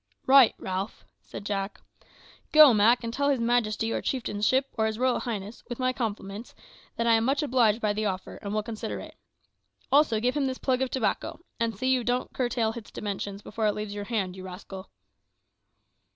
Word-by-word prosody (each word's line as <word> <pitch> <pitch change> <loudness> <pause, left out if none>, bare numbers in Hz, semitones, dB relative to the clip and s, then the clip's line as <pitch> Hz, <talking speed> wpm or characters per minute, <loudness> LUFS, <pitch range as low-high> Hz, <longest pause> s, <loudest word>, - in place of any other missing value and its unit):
"Right, 265 -3 +7
Ralph," 190 +3 -5 0.2
said - - -9
Jack. 200 0 -3 0.7
"Go, 305 -4 +9
Mak, 225 +4 +4
and 230 0 -4
tell 280 +3 +1
his 275 -3 +2
majesty, 230 -2 +1
or - - -1
chieftainship, 255 +1 0
or 220 -1 +1
his 220 0 -3
royal 255 +1 +1
highness, 215 -2 -5
with 240 - -4
my 255 0 0
compliments, 215 -2 -5 0.4
that 230 - -1
I 230 - +5
am 225 0 +3
much 275 +5 +1
obliged 240 -6 +3
by 210 -1 +1
the 215 0 -1
offer, 190 -1 -4
and 200 - -6
will 215 0 -1
consider 210 - -5
it. 95 - -10 0.8
Also 280 -6 +4
give 250 +4 0
him 285 -2 +1
this 260 -1 -3
plug 260 -1 0
of 265 - 0
tobacco; 260 +6 -2 0.2
and 230 -3 -1
see 260 +4 +1
you 255 -2 +2
don't 245 +2 -1
curtail 240 -3 0
its 230 -3 -9
dimensions 200 0 -5
before 220 0 -1
it 210 - +1
leaves 210 -1 -4
your 205 0 -5
hand, 200 -5 -2
you 190 - -9
rascal." 190 +1 -9
225 Hz, 195 wpm, -27 LUFS, 205-255 Hz, 0.8 s, Go